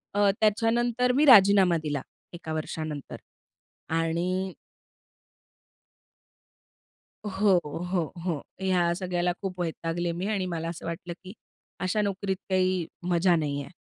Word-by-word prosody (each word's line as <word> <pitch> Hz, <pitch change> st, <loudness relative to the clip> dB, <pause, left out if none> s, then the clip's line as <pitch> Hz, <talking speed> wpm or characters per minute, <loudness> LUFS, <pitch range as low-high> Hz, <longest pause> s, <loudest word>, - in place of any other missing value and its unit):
अ, 205 Hz, -, +2 dB, 0.2 s
त्याच्यानंतर 235 Hz, +3 st, +2 dB
मी 300 Hz, -, +5 dB
राजीनामा 200 Hz, -, +7 dB
दिला 145 Hz, -3 st, -2 dB, 0.3 s
एका 165 Hz, -2 st, -6 dB
वर्षानंतर 155 Hz, -2 st, -5 dB, 0.8 s
आणि 180 Hz, +3 st, -1 dB, 2.7 s
हो, 195 Hz, -2 st, +3 dB, 0.3 s
हो, 180 Hz, -3 st, +2 dB, 0.2 s
हो. 165 Hz, -6 st, -1 dB, 0.2 s
ह्या 180 Hz, -2 st, +2 dB
सगळ्याला 180 Hz, -1 st, -1 dB
खूप 185 Hz, -2 st, -5 dB
वैतागले 170 Hz, +1 st, -2 dB
मी 175 Hz, +3 st, -3 dB
आणि 195 Hz, -3 st, -1 dB
मला 165 Hz, -2 st, -3 dB
असं 170 Hz, -1 st, -7 dB
वाटलं 170 Hz, +1 st, -5 dB
की 185 Hz, +1 st, -9 dB, 0.5 s
अशा 190 Hz, +3 st, 0 dB
नोकरीत 200 Hz, -1 st, -1 dB
काही 185 Hz, -2 st, +1 dB, 0.2 s
मजा 175 Hz, 0 st, +3 dB
नाहीये. 145 Hz, -3 st, -2 dB
180 Hz, 115 wpm, -27 LUFS, 165-195 Hz, 2.7 s, राजीनामा